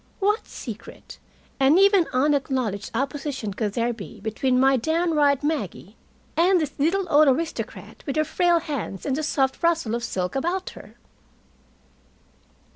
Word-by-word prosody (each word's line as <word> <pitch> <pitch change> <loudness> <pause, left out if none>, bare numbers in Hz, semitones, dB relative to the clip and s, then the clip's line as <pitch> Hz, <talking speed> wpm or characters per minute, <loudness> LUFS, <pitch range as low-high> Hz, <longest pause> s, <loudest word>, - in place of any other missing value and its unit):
What 415 +2 +1
secret 230 -2 -9 0.4
and 275 +5 +5
even 395 -3 +5
unacknowledged 260 -6 0
opposition 270 -4 -3
could 210 0 -2
there 235 +1 0
be 220 -4 -10
between 250 +4 0
my 270 +1 +5
downright 300 0 +1
Maggie 225 - -3 0.4
and 360 +2 +4
this 295 -3 -2
little 360 +7 +1
old 300 -1 +5
aristocrat 315 +5 -2
with 275 - -2
her 310 - +3
frail 345 +2 +2
hands 285 - -5
and 275 - 0
the 310 - -2
soft 270 -3 0
rustle 330 -9 +1
of 235 0 -2
silk 180 -3 -3
about 350 +7 -2
her? - - -14
280 Hz, 140 wpm, -24 LUFS, 240-330 Hz, 0.4 s, and